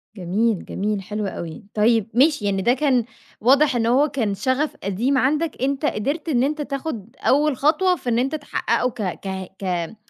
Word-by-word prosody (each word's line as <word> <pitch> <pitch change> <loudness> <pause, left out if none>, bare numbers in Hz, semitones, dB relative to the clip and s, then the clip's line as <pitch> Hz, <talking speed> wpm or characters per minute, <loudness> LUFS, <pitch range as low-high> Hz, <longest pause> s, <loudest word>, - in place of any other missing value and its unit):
جميل 200 +3 0
جميل، 205 0 -2
حلو 210 +1 -4
أوي. 170 +3 -6
طيب 220 0 +3
ماشي، 275 -3 +3
يعني 195 -1 0
ده 240 +6 +3
كان 260 -4 +2 0.4
واضح 275 +4 +4
إن 230 -1 +1
هو 265 +6 +4
كان 225 -8 -1
شَغَف 260 +8 0
قديم 235 +8 0
عندك، 300 +4 +1
أنتَ 275 +2 0
قَدَرت 290 +8 -1
إن 250 -3 +2
أنتَ 300 +2 -1
تاخُد 270 -5 -5
أول 290 0 +2
خطوة 360 +5 +3
في 250 - -5
إن 230 - +2
أنتَ 270 +5 0
تحقِّقه 290 -3 -1
ك 225 - -8 0.3
ك 190 -1 -5
ك 175 +1 -2
250 Hz, 180 wpm, -22 LUFS, 210-285 Hz, 0.4 s, واضح